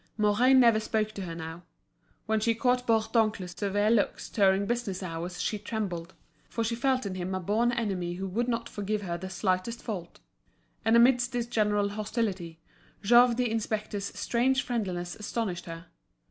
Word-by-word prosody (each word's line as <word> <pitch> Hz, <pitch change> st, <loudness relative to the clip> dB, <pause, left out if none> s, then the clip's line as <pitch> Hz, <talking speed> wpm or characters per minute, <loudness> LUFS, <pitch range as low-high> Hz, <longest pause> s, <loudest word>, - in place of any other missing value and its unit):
Mouret 215 Hz, +5 st, +4 dB
never 235 Hz, -4 st, +6 dB
spoke 215 Hz, 0 st, -1 dB
to 205 Hz, -, -7 dB
her 165 Hz, -1 st, -6 dB
now. 165 Hz, +1 st, -7 dB, 0.6 s
When 220 Hz, 0 st, +1 dB
she 230 Hz, +1 st, +1 dB
caught 250 Hz, +2 st, +1 dB
Bourdoncle's 220 Hz, -4 st, +1 dB
severe 205 Hz, +3 st, 0 dB
looks 220 Hz, -3 st, 0 dB
during 195 Hz, -1 st, +3 dB
business 220 Hz, -5 st, -2 dB
hours 175 Hz, +1 st, -5 dB
she 210 Hz, -, -1 dB
trembled, 190 Hz, -5 st, -4 dB, 0.3 s
for 230 Hz, -, -2 dB
she 230 Hz, +1 st, -1 dB
felt 255 Hz, +1 st, +1 dB
in 195 Hz, -, -3 dB
him 185 Hz, 0 st, -3 dB
a -, -, -1 dB
born 215 Hz, +6 st, +1 dB
enemy 195 Hz, -7 st, -2 dB
who 190 Hz, +2 st, -4 dB
would 230 Hz, +6 st, -1 dB
not 235 Hz, -1 st, -1 dB
forgive 205 Hz, 0 st, -3 dB
her 170 Hz, -2 st, -3 dB
the 190 Hz, +2 st, -6 dB
slightest 190 Hz, +4 st, -1 dB
fault. 185 Hz, -6 st, -6 dB, 0.6 s
And 225 Hz, +1 st, +4 dB
amidst 245 Hz, +1 st, +4 dB
this 240 Hz, -1 st, -1 dB
general 210 Hz, -3 st, +1 dB
hostility, 200 Hz, -5 st, -3 dB, 0.4 s
Jouve 240 Hz, +3 st, +6 dB
the 245 Hz, -3 st, +1 dB
inspector's 215 Hz, -2 st, -2 dB
strange 260 Hz, +3 st, +1 dB
friendliness 185 Hz, -8 st, -3 dB
astonished 210 Hz, -4 st, -3 dB
her. 165 Hz, 0 st, -8 dB
210 Hz, 165 wpm, -28 LUFS, 185-235 Hz, 0.6 s, never